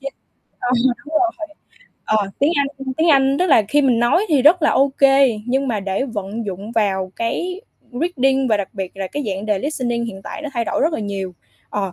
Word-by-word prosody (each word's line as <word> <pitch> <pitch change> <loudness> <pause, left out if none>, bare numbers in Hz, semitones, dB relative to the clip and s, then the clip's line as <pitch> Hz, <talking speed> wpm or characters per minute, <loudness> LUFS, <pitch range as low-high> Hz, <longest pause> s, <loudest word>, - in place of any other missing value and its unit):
D 275 - -21 0.6
ờ, 245 - -1 0.4
đúng 310 - -7
rồi. 335 -1 0 0.6
Ờ, 210 -2 0
tiếng 290 +4 +3
Anh 280 -1 +2 0.3
tiếng 330 +1 +3
Anh, 275 -1 +4
tức 365 - +2
là 275 -9 +5
khi 290 +4 +3
mình 250 -4 +3
nói 240 - +3
thì 290 -6 +3
rất 320 +4 +5
là 300 - +4
ô 275 +1 +3
kê, 270 -5 +4
nhưng 270 +2 0
mà 215 -4 -1
để 195 +6 -2
vận 215 -2 -5
dụng 200 +4 -6
vào 190 -4 0
cái 360 +11 -2 0.3
reading 270 -2 +1
và 215 - +3
đặc 200 -2 -3
biệt 190 -1 -5
là 195 -1 -3
cái 290 - -4
dạng 195 +1 -3
đề 210 -2 +1
listening 240 -3 -2
hiện 195 -4 -7
tại - - -7
nó 300 - -4
thay 235 -1 0
đổi - - -2
rất 320 +3 +2
là 310 - -2
nhiều, 195 -3 -4 0.4
ờ, 195 -3 -2
245 Hz, 220 wpm, -20 LUFS, 205-285 Hz, 0.6 s, là